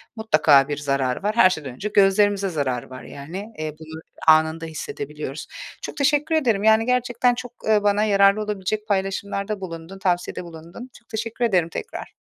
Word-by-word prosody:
Mutlaka 155 - +4
bir 145 - -3
zararı 140 +1 -1
var. 210 +2 0
Her 185 -5 +7
şeyden 150 -8 -5
önce 200 +11 -5
gözlerimize 200 0 +3
zararı 135 -7 -2
var. 130 0 -10
Yani, 185 +10 -8
eee, 155 -1 -3
bunu 160 0 -9 0.3
anında 160 +1 +4
hissedebiliyoruz. 425 - -6 0.3
Çok - - -7
teşekkür 295 +3 +2
ederim, 230 -10 +1
yani, 220 +1 +5
gerçekten 245 0 +1
çok, 245 -1 -7 0.2
eee, 210 -1 +3
bana 205 +1 +2
yararlı 200 0 +4
olabilecek 210 +1 -3
paylaşımlarda 200 +1 -2
bulundun, 170 +1 -8
tavsiyede 180 -1 -1
bulundun. 170 +9 -11
Çok 235 - -38
teşekkür 230 +2 -2
ederim 180 -6 +2
tekrar. 460 - -7
195 Hz, 160 wpm, -23 LUFS, 160-220 Hz, 0.3 s, Her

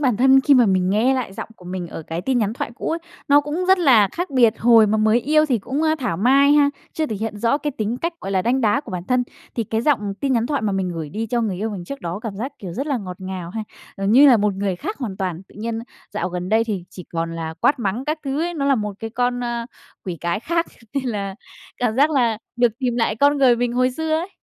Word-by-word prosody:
bản 255 -7 +2
thân 265 +2 +6
khi 280 +1 +4
mà 245 -3 +5
mình 185 -1 +2
nghe 235 +6 +3
lại 250 -7 -3
giọng - - -7
của 180 - -17
mình 180 0 -5
ở 160 - -7
cái 165 +2 -4
tin 260 -2 +1
nhắn 215 -1 0
thoại 230 - -4
cũ - - -4
ấy, 330 - -1 0.3
nó 290 +1 +6
cũng 300 +5 -3
rất 380 0 +6
là 240 - +5
khác 355 0 -3
biệt. 235 -4 +4
Hồi 230 -2 +6
mà 215 +1 +1
mới 220 +3 +3
yêu 305 +4 +3
thì 250 -5 +1
cũng, 270 +9 -3
a, 315 0 +3
thảo 230 -11 -2
mai 275 +7 +5
ha, 290 -1 +5 0.2
chưa 315 -1 -1
thể 215 - -4
hiện 220 0 -4
rõ 235 +6 +2
cái 295 0 -2
tính 225 -1 -3
cách, 335 +5 -2
gọi 195 - -5
là, 190 -1 +1
đanh 255 +3 +1
đá 230 +5 +2
của 245 - -11
bản 180 -1 -4
thân, 250 +2 +2 0.3
thì 230 - -1
cái 220 +2 -1
giọng 210 -8 +1
tin 275 -2 +1
nhắn 235 -2 +1
thoại 285 -2 -1
mà 205 -2 0
mình 190 -1 -1
gửi 165 -3 -5
đi 220 +8 -4
cho 235 +2 0
người 205 -5 -1
yêu 215 +3 -2
mình 185 -4 -6
trước 280 +7 -7
đó 170 +2 -4
cảm 220 -4 -6
giác, 260 +7 -4
kiểu, 180 -4 -7
rất 275 - -3
là 285 -3 0
ngọt 180 -3 -7
ngào 185 -2 -6
ha, 220 +3 -4 0.3
gần 195 +1 0
như 280 +4 +8
là 250 - +7
một 210 -2 +1
người 195 -2 -2
khác 420 - -5
hoàn 215 -8 -4
toàn. 185 -2 -3
Tự - - -20
nhiên 225 +1 -3 0.3
dạo 205 - -2
gần 180 0 -4
đây 220 +2 +3
thì 200 -6 -3
chỉ 180 - -10
còn 165 0 -2
là 160 -1 -4
quát 285 - +3
mắng 230 +3 -2
các 305 +1 -1
thứ 275 +2 -1
ấy, 345 0 -2
nó 280 - -2
là 275 - +4
một 210 -4 -2
cái 225 -1 -5
con, 245 +1 -1
a, 235 -1 -3 0.4
quỷ 180 -3 -4
cái 170 +4 -1
khác 335 +5 0 0.3
nên 275 -1 -1
là 200 -5 -3 0.4
cảm 240 -3 0
giác 290 +4 +4
là 235 -7 +2 0.2
được 240 -2 +3
tìm 245 -2 -1
lại 225 -2 +1
con 285 +3 +3
người 250 -3 +5
mình 245 0 -1
hồi 255 +1 +2
xưa 320 +4 -4
ấy. 330 +4 -1
230 Hz, 285 wpm, -21 LUFS, 200-270 Hz, 0.4 s, như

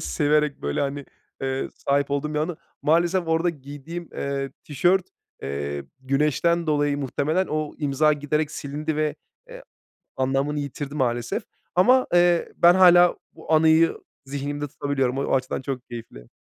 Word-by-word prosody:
severek, 150 - +1
böyle, 70 0 -1
hani, 140 0 -2 0.4
ııı, 135 0 -2
sahip 140 0 -1
olduğum 145 +2 -2
bir - - +1
anı. 160 +2 -2 0.3
Maalesef 170 +2 +2
orada 165 +2 +2
giydiğim, 150 +3 -8
eee, 140 -1 -3
tişört, 175 +6 +2 0.4
eee, 70 +1 -4 0.2
güneşten 150 +5 +1
dolayı 145 -2 +1
muhtemelen 150 +6 0
o 155 -1 -2
imza 150 +1 +2
giderek 150 +1 -1
silindi 150 +2 -4
ve, 155 -1 0 0.3
eee, - - -10 0.5
anlamını 135 +3 0
yitirdi 140 0 -5
maalesef. 120 -4 -1 0.3
Ama, 250 +9 +5
eee, 175 -1 +4
ben 175 +1 +6
hâlâ 175 -1 +6 0.2
bu - - -6
anıyı 160 +1 +4 0.3
zihnimde 145 +1 -4
tutabiliyorum. 135 -2 -1
O 140 - 0
açıdan 130 0 -1
çok 135 -2 -4
keyifli. 115 - -10
145 Hz, 140 wpm, -24 LUFS, 135-160 Hz, 0.5 s, ben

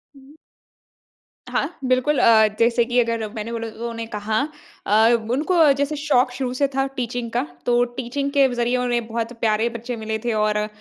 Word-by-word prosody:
उम 275 +1 -17 1.2
हाँ, 345 - -2
बिल्कुल। 255 +3 +2
अ, 220 -2 +6
जैसे 235 +1 +3
कि 245 +1 +1
अगर 230 -2 0
मैंने 220 +1 -5
बोला 230 -1 -4
तो - - -15
उन्होंने 230 -1 -4
कहा 215 +2 -1 0.5
अ, - - -2 0.4
उनको 310 +8 0 0.2
जैसे 285 +2 -1
शौक़ 255 -4 +2
शुरू 255 -1 -3
से 280 - +2
था 270 0 +2
टीचिंग 240 -1 -3
का - - 0 0.2
तो 240 0 +3
टीचिंग 275 +3 -3
के 280 -2 +4
ज़रिए 240 +1 0
उन्हें 240 -2 -1
बहुत 230 +1 -3
प्यारे 220 0 +1
बच्चे 235 +1 -6
मिले 220 0 -3
थे 235 - 0
और 215 0 +1
अ, 210 0 -1
240 Hz, 185 wpm, -22 LUFS, 225-255 Hz, 1.2 s, अ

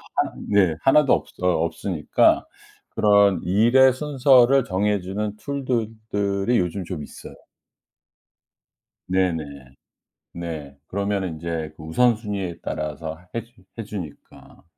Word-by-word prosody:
하나 - - 0 0.2
네, 95 -6 +3
하나도 140 +1 +4
없 - - +1 0.2
어 90 - +1 0.2
없으니까 85 -1 +1 0.4
그런 100 -3 +3
일의 120 +8 +5
순서를 135 -2 +4
정해주는 105 0 -1
툴들 130 -3 -2 0.2
들이 100 +3 0
요즘 90 +2 -2
좀 85 -3 -5
있어요. - - -11 1.7
네네. 90 -4 +1 0.9
네, 80 -5 -7
그러면은 100 -1 -2
인제 80 -1 -5
그 - - -11
우선순위에 105 -1 0
따라서 80 +1 -4 0.2
해 115 - -2
주 115 -4 -24
해 115 - -4
주니까 95 -8 -10
100 Hz, 230 characters per minute, -23 LUFS, 85-115 Hz, 1.7 s, 일의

